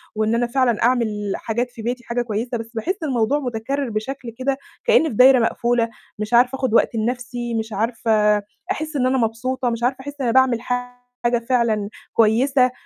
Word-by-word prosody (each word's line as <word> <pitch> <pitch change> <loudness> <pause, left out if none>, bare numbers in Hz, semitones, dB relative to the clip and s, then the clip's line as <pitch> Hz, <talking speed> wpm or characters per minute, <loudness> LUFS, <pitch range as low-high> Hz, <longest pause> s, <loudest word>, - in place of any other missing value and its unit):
وإن 215 +1 +1
أنا 240 +1 +1
فعلًا 240 -3 +1
أعمل 220 -5 +1
حاجات 240 +2 -2
في 230 - -10
بيتي 245 +2 -3
حاجة 240 +1 -1
كويسة. 235 +1 -3
بس 225 +1 -8
باحسّ 240 - -2
الموضوع 265 -1 +1
متكرر 260 +1 -3
بشكل 235 +4 -4
كده 270 +1 -1 0.3
كأنى 320 - +4
فى 235 - -6
دايرة 255 +2 +7
مقفولة، 235 0 +1 0.3
مش 215 +2 -4
عارفة 250 +2 +5
آخد 260 -4 -1
وقت 235 - +3
لنفسي، 240 +1 -3
مش 220 -1 -3
عارفة 215 -1 +2 0.3
أحسّ 310 -4 -3
إن 260 -3 +1
أنا 260 +1 +2
مبسوطة، 245 +2 -1
مش 235 0 -3
عارفة 255 +2 +1
أحس 285 +2 -7
إن - - 0
أنا 230 - +1
باعمل 260 -3 +3
حاجة 245 -1 -3
فعلًا 225 -5 +1 0.2
كويسة 250 +4 +3
240 Hz, 180 wpm, -21 LUFS, 225-255 Hz, 0.3 s, دايرة